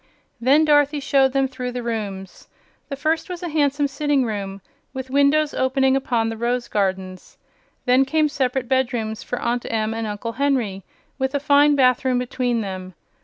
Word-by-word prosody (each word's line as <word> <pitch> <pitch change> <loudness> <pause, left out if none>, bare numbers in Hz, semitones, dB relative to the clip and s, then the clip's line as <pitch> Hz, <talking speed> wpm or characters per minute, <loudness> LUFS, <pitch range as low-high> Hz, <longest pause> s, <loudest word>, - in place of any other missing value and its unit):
Then 280 +6 +4
Dorothy 290 -1 +3
showed 270 -1 +2
them 270 -1 +2
through 250 -1 -5
the 245 -1 -4
rooms. 200 -5 -5 0.4
The 280 - -3
first 315 +5 -1
was 360 -1 -6
a 350 - -3
handsome 290 -2 +1
sitting 285 -1 0
room, 200 -3 -4 0.3
with 260 0 -6
windows 285 +2 +3
opening 265 0 +2
upon 240 -4 0
the 225 - -5
rose 240 +1 -1
gardens. 190 -2 -3 0.5
Then 255 +2 +4
came 305 +3 +1
separate 260 -3 -1
bedrooms 240 -4 -1
for 245 - -4
Aunt 240 0 -2
Em 220 -1 -1
and 225 0 -3
Uncle 210 +2 -4
Henry, 250 -7 -1 0.4
with 265 +1 -1
a - - +2
fine 290 +1 +4
bathroom 255 -1 +3
between 245 -1 -1
them. 185 -2 -6
255 Hz, 170 wpm, -22 LUFS, 225-280 Hz, 0.5 s, Then